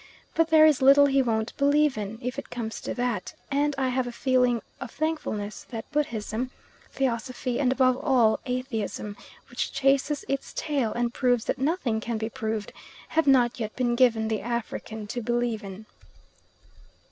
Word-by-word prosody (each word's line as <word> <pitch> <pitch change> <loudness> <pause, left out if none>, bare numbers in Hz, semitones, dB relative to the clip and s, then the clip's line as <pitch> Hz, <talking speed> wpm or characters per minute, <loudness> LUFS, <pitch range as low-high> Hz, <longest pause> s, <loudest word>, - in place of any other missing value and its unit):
But 330 0 +3
there 315 -1 +7
is 305 -4 +4
little 280 +2 +7
he 275 -1 +3
won't 225 -3 -1
believe 290 0 +3
in, 210 +1 -5
if 250 +3 -3
it - - -9
comes 225 -2 -5
to - - -4
that; 245 -6 -2 0.2
and 290 +1 +1
I 265 -1 +1
have 255 0 0
a - - -4
feeling 250 -1 +2 0.2
of 250 - -6
thankfulness 225 -10 -3
that 225 +1 -7
Buddhism, 245 -4 -2 0.4
Theosophy, 250 -1 -2
and 260 -3 +2
above 255 -1 +3
all 250 -7 +3
Atheism, 230 -5 -3 0.4
which 245 - -2
chases 275 +2 +1
its 275 0 -3
tail 275 -8 0
and 240 0 -1
proves 245 -3 +1
that 275 - -2
nothing 270 -6 0
can 235 0 -2
be 220 +1 -3
proved, 220 -4 -3 0.4
have 320 -1 +1
not 250 -2 +4
yet 220 -2 -4
been 245 -2 +1
given 230 -3 +3
the 220 -1 -1
African 225 -1 -4
to 240 +4 -4
believe 240 -1 -1
in. 195 +2 -9
245 Hz, 170 wpm, -26 LUFS, 225-275 Hz, 0.4 s, there